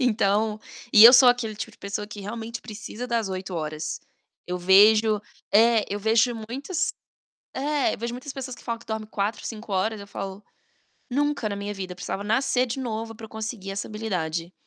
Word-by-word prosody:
Então 215 -3 +2 0.3
e 215 0 +10
eu 240 - +12
sou 255 0 +8
aquele 245 -3 +1
tipo 225 +1 -6
de - - -21
pessoa 205 +1 -4
que 210 -1 -9
realmente 230 +3 -6
precisa 225 +2 -7
das 230 -4 0
8 185 0 -5
horas. 155 -1 -4 0.5
Eu 180 0 -3
vejo 210 +3 +6 0.3
é, 225 0 +5
eu 205 - -3
vejo 220 +3 +3 0.2
muitas 285 +8 -2 0.6
é, 290 +1 0
eu - - -10
vejo 235 +1 -3
muitas 265 +3 -7
pessoas 265 -2 -6
que - - -15
falam 230 -1 -3
que - - -17
dorme 220 -1 -4
4, 205 +1 -2
5 220 -2 -7
horas, 210 +3 0
eu 200 - -9
falo: 195 0 -6 0.7
"Nunca 285 -3 0
na 200 - -4
minha 205 +1 -4
vida, 185 -2 -6
precisava 190 +2 -5
nascer 250 +3 +2
de 245 +2 -4
novo 225 -2 -4
pra 225 0 -11
eu - - -19
conseguir 220 -3 -5
essa 195 - -4
habilidade". 180 -6 -3
220 Hz, 190 wpm, -25 LUFS, 200-235 Hz, 0.7 s, eu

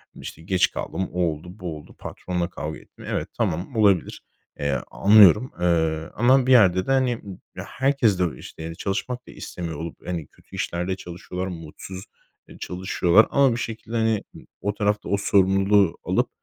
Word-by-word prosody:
işte, - - -9
geç 90 +2 +2
kaldım, 95 -1 -4
o 90 - -1
oldu, 80 -1 -1
bu 85 -4 -5
oldu, 75 - -15
patronla 90 -1 -4
kavga 80 -2 -6
ettim. - - -16
Evet, - - -2
tamam 90 +10 -2
olabilir. 100 -5 +2 0.4
Eee, 70 -2 0
anlıyorum, 105 +3 +6
eee, 80 -2 +1
ama 130 +3 +4
bir - - +3
yerde 95 -7 +5
de, - - -1
hani, 130 -2 +3
ım 100 -5 -10 0.2
herkes 130 -8 +1
de - - +3
o 85 - -3
işte 80 0 -9
de 80 - -7
çalışmak 125 +7 -3
da - - -10
istemiyor 85 -2 -6
olup, 80 +2 -8
hani, 85 -4 -3
kötü - - -17
işlerde 90 +2 -2
çalışıyorlar, 90 0 -6
mutsuz, 90 +2 -8 0.4
eee, - - -14
çalışıyorlar 90 +2 +2
ama 140 -2 +4
bir 115 - -1
şekilde, 115 0 -5
hani, 110 -2 +1
ı - - -10 0.2
o 105 - -1
tarafta 105 0 -1
o 100 - +2
sorumluluğu 95 -1 +3
alıp, - - 0
95 Hz, 175 wpm, -24 LUFS, 85-105 Hz, 0.4 s, anlıyorum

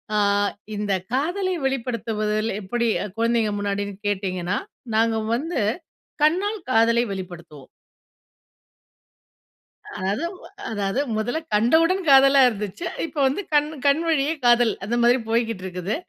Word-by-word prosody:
அ - - +2 0.6
இந்த 205 -1 -1 0.2
காதலை 355 +8 0
வெளிப்படுத்துவதில் 225 -4 -1
எப்படி 235 +5 -1 0.3
குழந்தைங்க 230 -1 +1
முன்னாடின்னு 200 0 -2
கேட்டிங்கனா? 190 -2 -1 0.4
நாங்க 225 0 +2 0.2
வந்து, 300 +1 -2 0.6
கண்ணால் 390 +7 +1
காதலை 230 0 +4
வெளிப்படுத்துவோம். 170 -7 -9 2.4
அத 205 - -1 0.5
அதாவது 205 +2 -1 0.2
முதல்ல 245 +8 -1 0.2
கண்டவுடன் 330 - +3
காதலா 275 0 +7
இருந்துச்சு. 210 - -5 0.2
இப்ப 325 - -10
வந்து 270 +9 -1
கண்ணு 300 +1 +2
கண் 280 +3 +3
வழியே 300 -1 +2
காதல், 240 -2 +5
அந்த 235 +4 -1
மாரி 240 +2 +5
போய்க்கிட்டு 230 -4 0
இருக்குது. 185 +2 -3
230 Hz, 110 wpm, -23 LUFS, 205-275 Hz, 2.4 s, காதலா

